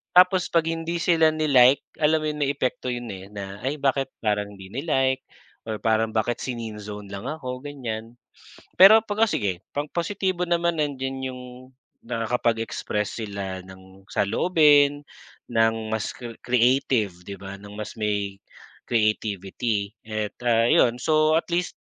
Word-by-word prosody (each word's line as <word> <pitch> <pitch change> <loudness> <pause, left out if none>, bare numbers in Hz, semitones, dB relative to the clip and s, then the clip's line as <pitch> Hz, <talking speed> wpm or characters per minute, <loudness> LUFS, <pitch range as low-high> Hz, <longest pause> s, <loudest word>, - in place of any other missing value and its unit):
Tapos 180 0 +6
'pag 165 -1 +4
hindi 165 +1 -3
sila 165 -2 +4
ni-like 140 -4 +5 0.2
alam 155 +1 +3
mo - - -1
'yon, 150 - -7
may 140 -1 +2
epekto 125 0 -2
'yon 120 -1 -5
eh 95 0 -9
na, 100 -1 -7
ay 135 +3 0
bakit 135 -1 +1 0.2
parang 105 -1 0
'di 95 -1 -11
ni-like 135 0 +1 0.5
or 110 - -2
parang 110 0 +1
bakit 115 +2 0
si-neen-zone 105 -4 -6
lang 100 0 -6
ako, 130 -5 -5
ganyan. 120 -6 -6 0.7
Pero 195 +4 +10
'pag, 210 0 -1
o - - -3
sige 95 - -1
pang 145 +1 -1
positibo 185 +1 -1
naman. 170 -1 +1
Nandiyan 135 -2 -3
'yong 125 0 -9 0.6
nakakapag-express 115 -2 -2
sila 95 -2 -5
ng 95 +1 -15
saloobin, 145 - +4 0.5
ng 115 0 +4 0.2
mas 110 -1 -1
cre 120 -2 -8
creative, 125 -4 +2
'di 100 - -7
ba, 100 0 -7
ng 105 0 -11
mas 105 0 -6
may 100 -2 -1 0.5
creativity 105 -1 0
at 110 -1 -3
ah, 115 -1 +4
'yon 120 0 +4
so 155 +3 +3
at - - -5
least 175 +1 -1
120 Hz, 150 wpm, -24 LUFS, 105-150 Hz, 0.7 s, Pero